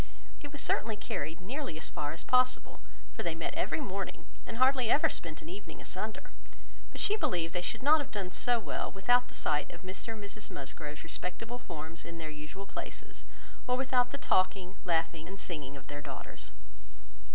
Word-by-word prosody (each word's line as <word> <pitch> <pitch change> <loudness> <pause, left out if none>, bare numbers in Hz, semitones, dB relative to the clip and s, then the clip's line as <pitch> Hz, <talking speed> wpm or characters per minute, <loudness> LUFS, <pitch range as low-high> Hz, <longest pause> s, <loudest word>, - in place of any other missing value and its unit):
It 290 - -6
was 295 - -3
certainly 220 0 +2
carried 165 -4 -3
nearly 255 - -2
as 160 - -1
far 145 0 -1
as 165 - -5
possible, 255 0 +4 0.3
for - - -3
they - - 0
met - - -1
every - - +1
morning, 195 -8 -3 0.2
and 230 - -4
hardly 255 -2 +5
ever 290 - +6
spent 155 -3 -3
an 160 - -7
evening 200 +3 -7
asunder; 215 +4 -3 0.6
but - - -7
she 415 - +4
believed 175 - +1
they 180 - +1
should 180 - -1
not 305 +3 +8
have 285 - -3
done 195 -3 -2
so 245 +5 +3
well - - -2
without 245 +6 +5
the - - -10
sight 150 -1 +1
of 175 - -10
Mr 190 +4 -4
and 215 -2 -7
Mrs 205 +1 -5
Musgrove's 150 +2 -5
respectable 225 +8 -3
forms 165 -4 -6
in 170 - -6
the 155 -2 -4
usual 150 +6 -7
places, 195 - -6 0.4
or 250 0 +4
without 255 -1 +4
the 280 - -3
talking, 185 -5 +3
laughing, 165 -2 +2
and 195 +2 -6
singing 145 -7 -4
of 135 - -11
their 145 0 -5
daughters. 140 -2 -6
190 Hz, 190 wpm, -33 LUFS, 160-245 Hz, 0.6 s, not